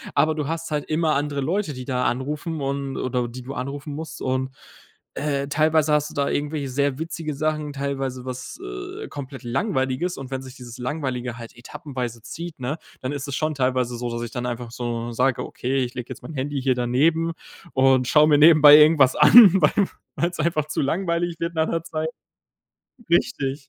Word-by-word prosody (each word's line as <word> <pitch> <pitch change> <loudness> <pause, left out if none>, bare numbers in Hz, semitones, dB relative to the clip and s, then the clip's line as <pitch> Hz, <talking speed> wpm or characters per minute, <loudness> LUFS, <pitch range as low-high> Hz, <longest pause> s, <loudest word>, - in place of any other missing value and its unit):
aber 155 0 +3
du 150 -2 -3
hast 165 0 -4
halt 150 -1 -1
immer 155 0 +1
andere 145 0 -1
Leute, 165 +3 -1
die 130 -1 -7
da 125 -2 -1
anrufen 150 +6 -2
und 140 0 -3
oder 125 -1 -1
die 125 +2 -9
du 135 +2 -7
anrufen 140 +3 -5
musst 160 +2 -7
und, 130 0 -1 0.7
äh, 140 -2 -1
teilweise 155 +1 +2
hast 150 0 +2
du - - -13
da 140 -1 +1
irgendwelche 145 -1 -2
sehr 140 +1 0
witzige 160 -1 -4
Sachen, 155 0 -1
teilweise 135 -2 -3
was, 130 0 -7
äh, - - -7
komplett 135 -1 -8
Langweiliges 130 - -1
und 135 -1 -8
wenn 130 - -3
sich 130 0 -11
dieses 125 -1 -10
Langweilige 125 -3 -3
halt 115 0 -10
etappenweise 120 -2 -6
zieht, 170 +2 -7
ne, 135 +6 -3 0.2
dann 130 - -3
ist 145 0 -4
es 140 - -3
schon 155 0 -1
teilweise 130 -3 0
so, 120 0 -3
dass 120 0 -3
ich 115 - -6
dann 125 -1 -3
einfach 120 -1 -5
so 120 -1 -4
sage: 125 +2 +1
„Okay, 130 +1 -1
ich 125 0 -5
lege 125 -2 -6
jetzt 130 - -9
mein 160 - -8
Handy 140 +1 -2
hier 130 -1 +3
daneben 150 +7 +1 0.4
und 130 -1 +4
schaue 150 +2 +5
mir 150 -2 +5
nebenbei 150 -1 +9
irgendwas 150 -3 +6
an, 225 -5 +9
weil 185 +6 +3 0.3
weil's 170 0 -2
einfach 155 -1 0
zu 155 - -2
langweilig 170 +3 -1
wird 170 0 -2
nach 160 -1 +1
'ner 165 -1 -2
Zeit.“ 160 -1 -3 1.0
Richtig. 140 - 0
140 Hz, 195 wpm, -23 LUFS, 130-155 Hz, 1.0 s, nebenbei